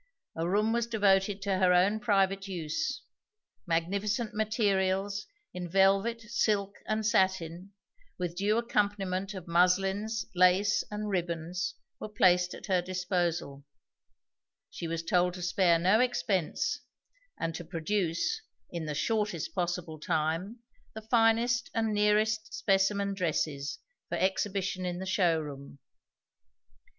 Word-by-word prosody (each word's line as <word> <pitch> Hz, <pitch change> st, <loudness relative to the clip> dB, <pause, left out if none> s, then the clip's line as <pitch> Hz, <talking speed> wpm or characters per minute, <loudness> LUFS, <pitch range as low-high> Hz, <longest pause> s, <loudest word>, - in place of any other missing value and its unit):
A 165 Hz, +1 st, -2 dB
room 210 Hz, +4 st, +2 dB
was 235 Hz, -1 st, 0 dB
devoted 200 Hz, -3 st, +2 dB
to 195 Hz, -2 st, 0 dB
her 185 Hz, -1 st, +4 dB
own 195 Hz, +4 st, +3 dB
private 195 Hz, -3 st, +1 dB
use; 230 Hz, -, -3 dB, 0.6 s
magnificent 200 Hz, +7 st, -1 dB
materials 200 Hz, -2 st, 0 dB, 0.3 s
in 180 Hz, -1 st, -5 dB
velvet, 195 Hz, +5 st, +3 dB
silk, 210 Hz, -2 st, 0 dB
and 215 Hz, 0 st, -1 dB
satin, 190 Hz, -3 st, 0 dB, 0.4 s
with 175 Hz, -1 st, -3 dB
due 205 Hz, +4 st, +1 dB
accompaniment 200 Hz, -4 st, -1 dB
of 185 Hz, -2 st, -8 dB
muslins, 195 Hz, +5 st, +2 dB
laces, 185 Hz, +2 st, +4 dB
and 210 Hz, 0 st, -4 dB
ribbons 175 Hz, -2 st, -2 dB, 0.2 s
were 215 Hz, -, -6 dB
placed 180 Hz, -5 st, +3 dB
at -, -, -10 dB
her 185 Hz, -3 st, +2 dB
disposal; 175 Hz, -6 st, -2 dB, 1.1 s
she 170 Hz, -, -5 dB
was 165 Hz, 0 st, -3 dB
told 180 Hz, +1 st, +2 dB
to 180 Hz, -, -6 dB
spare 175 Hz, -1 st, +3 dB
no 185 Hz, +6 st, +3 dB
expense, 190 Hz, -8 st, 0 dB, 0.6 s
and 165 Hz, 0 st, -2 dB
to 175 Hz, -, -6 dB
produce, 175 Hz, -, -1 dB, 0.3 s
in 170 Hz, -2 st, -4 dB
the 150 Hz, -, -3 dB
shortest 210 Hz, -1 st, -1 dB
possible 175 Hz, -3 st, -3 dB
time, 165 Hz, +8 st, -1 dB, 0.3 s
the 220 Hz, -, -7 dB
finest 230 Hz, +1 st, +2 dB
and 225 Hz, -1 st, +1 dB
nearest 215 Hz, +1 st, +2 dB
specimen 200 Hz, 0 st, +1 dB
dresses 150 Hz, -5 st, -2 dB, 0.3 s
for -, -, -2 dB
exhibition 190 Hz, 0 st, -1 dB
in 180 Hz, -1 st, -2 dB
the 190 Hz, -, -5 dB
show 180 Hz, -4 st, +2 dB
room. 140 Hz, -2 st, -8 dB
190 Hz, 125 wpm, -30 LUFS, 175-210 Hz, 1.1 s, her